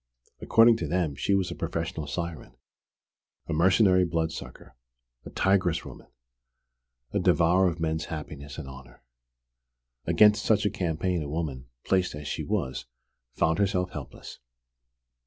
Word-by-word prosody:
According 115 0 +5
to 85 - -3
them 85 -2 0
she 100 +8 0
was 95 -2 0
a - - -5
professional 80 -2 -4
siren, 85 +1 -5 0.9
a 85 - -4
mercenary 95 +3 +4
blood 80 -1 -1
sucker, 80 -6 -10 0.5
a - - -8
"tigress 95 -4 +1
woman," - - -11 1.1
a - - +1
devourer 90 +3 +3
of 85 -1 -3
men's 80 0 -1
happiness 75 -2 -7
and 80 -4 -7
honour! 65 -2 -13 1.0
Against 105 +5 +5
such 110 -1 +2
a 105 - +2
campaign 90 0 -1
a 75 - -5
woman, 70 -5 -4 0.2
placed 95 -4 +1
as 75 0 -7
she - - -3
was, 65 - -3 0.5
found 80 +3 +1
herself 90 -2 0
helpless. - - -9
85 Hz, 140 wpm, -27 LUFS, 75-95 Hz, 1.1 s, According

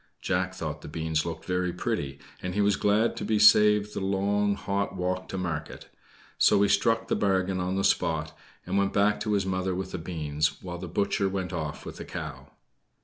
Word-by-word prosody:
Jack - - -1
thought - - -5
the - - -9
beans 80 0 -1
looked 80 -1 -6
very 90 -1 0
pretty, 70 -4 -3 0.2
and 90 0 -4
he 105 - +2
was 100 -1 +3
glad 105 +3 +2
to - - -5
be 110 - +1
saved 105 0 +6
the - - -3
long 100 +1 +1
hot 100 0 -2
walk 90 0 -2
to 95 - -4
market; 85 -4 -4 0.5
so - - +5
he - - +4
struck 115 +1 +2
the - - +1
bargain 95 -1 +1
on 90 +1 -1
the 95 - 0
spot 80 -4 +1 0.3
and 100 - 0
went 100 0 +1
back 105 +1 +3
to 105 - -1
his 100 -2 +1
mother 95 -1 -1
with 95 0 -4
the 90 - -4
beans, 75 -3 -2
while 90 -1 -6
the 90 - -6
butcher 100 +2 0
went 95 -1 -3
off 75 -3 -4
with - - -8
the - - -7
cow. 70 -3 -7
95 Hz, 205 wpm, -27 LUFS, 85-100 Hz, 0.5 s, saved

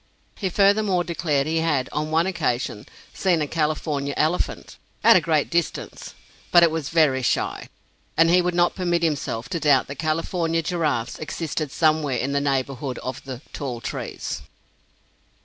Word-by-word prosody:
He 190 - -2
furthermore 200 -1 +3
declared 155 -5 0
he 160 +2 -1
had, 155 -5 +1
on 150 +1 -2
one 165 +2 +2
occasion, 130 - -2 0.3
seen 180 -4 +1
a 150 - 0
California 150 -2 -1
elephant, 160 +4 -1 0.3
"at 230 - +8
a 185 - +5
great 155 -2 +1
distance," 170 -1 -3 0.4
but 175 -1 +7
it 170 - +5
was 160 -2 -3
"very 150 -5 +3
shy," 125 - -1 0.5
and 165 +1 +5
he 180 +1 +5
would 180 0 -1
not 175 0 +3
permit 175 -2 0
himself 140 -7 -1
to 170 - -2
doubt 150 -2 +4
that 140 - -8
California 165 +1 0
giraffes 150 -9 -1
existed 155 -2 -3
somewhere 155 -4 +2
in 135 +3 -1
the 140 0 +1
neighborhood 135 -1 -2
of 130 0 -5
the 130 0 -7
"tall 130 -5 -4
trees." - - -5
155 Hz, 160 wpm, -23 LUFS, 140-170 Hz, 0.5 s, at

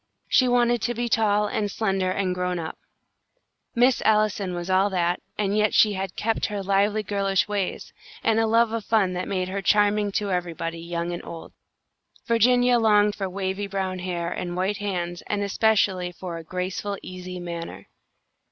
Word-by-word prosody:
She 255 - +4
wanted 240 -1 +3
to 240 +2 -1
be 240 +1 -1
tall, 210 -2 +2
and 205 0 -1
slender, 195 -3 0
and 185 0 0
grown 180 0 -2
up; 160 -2 -6 1.0
Miss 245 +2 +4
Allison 210 -4 +1
was 175 0 -4
that, 185 -2 +2 0.2
and 205 -1 0
yet 210 -1 +2
she 210 -1 +5
had 190 -1 -4
kept 225 +1 -1
all 210 - -3
her 200 - -3
lively 200 +2 +2
girlish 195 -1 0
ways, 205 -3 -3 0.3
and 225 0 +3
a 225 - +2
love 230 0 +3
of 230 -1 -2
fun 200 -5 +2
that 180 0 -3
made 185 -2 -1
her 195 +1 -3
charming 205 +1 +3
to 205 -1 -1
everybody, 165 -2 -3
young 170 +1 -3
and 175 - -5
old. 165 - -9 0.7
Virginia 245 +1 +4
longed 210 -2 +4
for 195 -2 -4
wavy 190 +1 -3
brown 190 -2 -3
hair 175 -1 -3
and 175 -1 -4
white 195 +3 0
hands, 175 -4 -3
and 205 -1 -1
especially 200 -3 +1
for 175 -1 -7
a 165 - -8
graceful, 185 +4 -3
easy 180 0 -7
manner. 170 -1 -7
195 Hz, 175 wpm, -25 LUFS, 180-210 Hz, 1.0 s, she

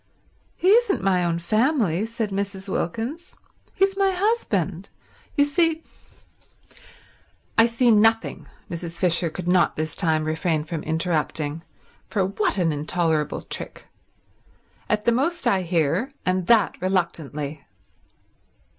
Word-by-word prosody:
"He 370 - +1
isn't 440 - +4
my 185 -2 +2
own 170 -1 0
family," 215 - +1
said 225 -2 -3
Mrs. 195 0 -3
Wilkins. 235 - -4 0.4
"He's 390 0 +2
my 390 0 +2
husband. 225 - -1 0.5
You 285 - +5
see—" 325 +2 +1 1.7
"I 225 +1 +6
see 235 +1 +2
nothing," 225 +1 +2 0.2
Mrs. 170 0 -6
Fisher 175 -1 +2
could 175 +2 -7
not 180 -1 +3
this 155 +1 -3
time 160 -4 +1
refrain 160 0 0
from 160 0 -5
interrupting—for 160 +4 -3
what 200 +2 -1
an 170 -3 +2
intolerable 155 +1 -1
trick. - - -6 1.0
"At 210 0 0
the 235 - +4
most 305 +8 0
I 190 - +3
hear, 175 - 0
and 185 -1 0
that 225 -6 +3
reluctantly." 155 -6 -2
190 Hz, 120 wpm, -23 LUFS, 165-230 Hz, 1.7 s, I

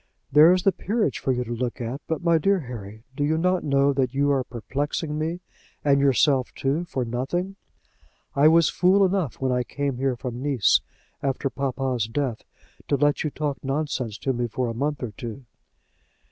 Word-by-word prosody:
"There 150 +4 +8
is 180 -1 +2
the 195 - +5
Peerage 210 - -1
for 135 - 0
you 125 -1 0
to 120 - -8
look 120 0 -3
at. 125 +4 -4
But, 160 +1 -2
my 170 -1 +4
dear 195 +3 +2
Harry, 110 -4 -9
do 145 - -1
you 155 +2 +1
not 180 +2 +1
know 140 0 +3
that 130 -1 0
you 145 +1 +2
are 135 -2 +2
perplexing 145 +6 -3
me 160 +3 -2 0.4
and 140 -1 +4
yourself 135 -1 +3
too, 145 +6 -1
for 130 -7 -3
nothing? 135 +11 -2 0.8
I 140 +2 +6
was 165 0 +5
fool 190 +2 +4
enough 185 -7 0
when 130 -1 0
I 125 0 +1
came 140 +2 -3
here 135 0 0
from 120 0 -6
Nice, 135 -7 +3 0.4
after 135 0 -1
papa's 130 -4 -1
death, 120 -1 -2 0.5
to - - +2
let 145 +1 +2
you 155 - 0
talk 145 -1 -3
nonsense 135 -6 -2
to 135 - -1
me 120 0 -1
for 120 +2 -2
a - - -3
month 140 +3 -2
or 120 - -3
two." 115 +5 -8
140 Hz, 190 wpm, -24 LUFS, 125-155 Hz, 0.8 s, There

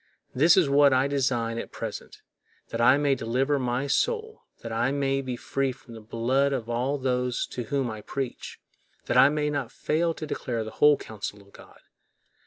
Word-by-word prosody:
This 155 +8 +5
is 180 -6 +5
what 140 0 +5
I 130 +1 +3
design 125 -5 0
at - - -7
present, - - -7 0.5
that 115 - -3
I 130 +4 +6
may 145 -1 +2
deliver 135 +4 0
my 125 +1 -1
soul, 445 - -1 0.2
that 115 - -6
I 120 +4 0
may 135 -1 0
be 130 -2 -4
free 135 +2 -2
from 130 -2 -14
the 110 - -10
blood 130 +6 0
of 120 -4 -3
all 125 +4 -1
those 125 -2 -1
to 120 - -4
whom 135 0 -1
I 110 -1 -7
preach—that 135 +4 -7
I 135 - +7
may 150 0 -1
not 140 -5 -3
fail 165 +1 -1
to 155 - -6
declare 120 -6 -3
the 110 - -7
whole 150 +3 +5
counsel 105 -1 -7
of 100 - -23
God. - - -15
130 Hz, 190 wpm, -26 LUFS, 120-140 Hz, 0.5 s, I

